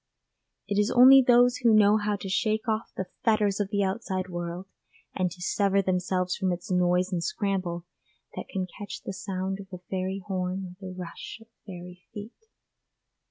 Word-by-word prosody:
It 200 Hz, 0 st, 0 dB
is 210 Hz, +2 st, +2 dB
only 260 Hz, +2 st, +8 dB
those 245 Hz, 0 st, +5 dB
who 230 Hz, -3 st, +4 dB
know 210 Hz, 0 st, +6 dB
how 210 Hz, -1 st, 0 dB
to 200 Hz, -, -7 dB
shake 215 Hz, +4 st, 0 dB
off 220 Hz, 0 st, -1 dB
the 190 Hz, -, -2 dB, 0.2 s
fetters 215 Hz, -3 st, +2 dB
of 205 Hz, -2 st, -1 dB
the 200 Hz, -1 st, +1 dB
outside 190 Hz, -2 st, -2 dB
world, 175 Hz, +1 st, -5 dB, 0.5 s
and 185 Hz, -2 st, 0 dB
to 180 Hz, +1 st, -9 dB
sever 200 Hz, +1 st, +2 dB
themselves 180 Hz, 0 st, 0 dB
from 190 Hz, -1 st, 0 dB
its 175 Hz, +1 st, -5 dB
noise 180 Hz, +1 st, +2 dB
and 175 Hz, -2 st, -1 dB
scramble, 180 Hz, -2 st, -2 dB, 0.5 s
that -, -, -6 dB
can 190 Hz, -1 st, -2 dB
catch 205 Hz, -1 st, -7 dB
the 195 Hz, -, -5 dB
sound 190 Hz, 0 st, -4 dB
of 195 Hz, -, -9 dB
a 180 Hz, -1 st, -9 dB
fairy 190 Hz, +1 st, -2 dB
horn 185 Hz, -1 st, -2 dB
or 180 Hz, 0 st, -10 dB
the 185 Hz, -, -7 dB
rush 180 Hz, +2 st, -8 dB
of 225 Hz, 0 st, -18 dB, 0.2 s
fairy 180 Hz, -1 st, -9 dB
feet. 210 Hz, +3 st, -7 dB
190 Hz, 180 wpm, -27 LUFS, 180-210 Hz, 0.5 s, only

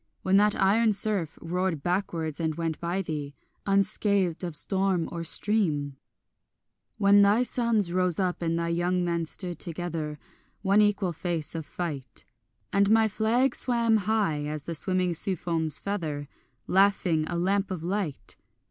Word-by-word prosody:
When 190 Hz, +1 st, +3 dB
that 210 Hz, +1 st, +3 dB
iron 215 Hz, +3 st, +3 dB
surf 200 Hz, -6 st, 0 dB
roared 175 Hz, -3 st, -2 dB
backwards 175 Hz, -4 st, -2 dB
and 160 Hz, -2 st, -1 dB
went 165 Hz, -1 st, -3 dB
by 175 Hz, +3 st, -2 dB
thee 145 Hz, -4 st, -5 dB, 0.3 s
Unscathed 195 Hz, -2 st, +1 dB
of 170 Hz, -3 st, -4 dB
storm 190 Hz, +1 st, +1 dB
or 170 Hz, -1 st, -4 dB
stream: 160 Hz, -7 st, 0 dB, 1.0 s
When 200 Hz, -1 st, +5 dB
thy 205 Hz, +4 st, +4 dB
sons 230 Hz, -7 st, +1 dB
rose 180 Hz, -1 st, +1 dB
up 180 Hz, -2 st, -1 dB
and 165 Hz, -1 st, 0 dB
thy 170 Hz, 0 st, -1 dB
young 175 Hz, +1 st, 0 dB
men 170 Hz, -1 st, -1 dB
stood 175 Hz, +1 st, -4 dB
together, 165 Hz, -3 st, -4 dB, 0.5 s
One 200 Hz, +1 st, +4 dB
equal 205 Hz, -4 st, +1 dB
face 165 Hz, -2 st, -2 dB
of 160 Hz, -3 st, -5 dB
fight, 145 Hz, -9 st, -5 dB, 0.5 s
And 200 Hz, 0 st, +3 dB
my 220 Hz, 0 st, +5 dB
flag 225 Hz, +5 st, +1 dB
swam 235 Hz, -3 st, +2 dB
high 200 Hz, -9 st, 0 dB
as 150 Hz, -1 st, -4 dB
the 170 Hz, -, -5 dB
swimming 180 Hz, +2 st, 0 dB
sea 185 Hz, +3 st, -1 dB
foam's 160 Hz, -3 st, 0 dB
feather, 155 Hz, -8 st, -4 dB, 0.4 s
Laughing, 185 Hz, -5 st, +2 dB
a 175 Hz, -, -3 dB
lamp 195 Hz, +3 st, 0 dB
of 180 Hz, -4 st, -5 dB
light? 180 Hz, -5 st, -4 dB
180 Hz, 150 wpm, -27 LUFS, 165-200 Hz, 1.0 s, When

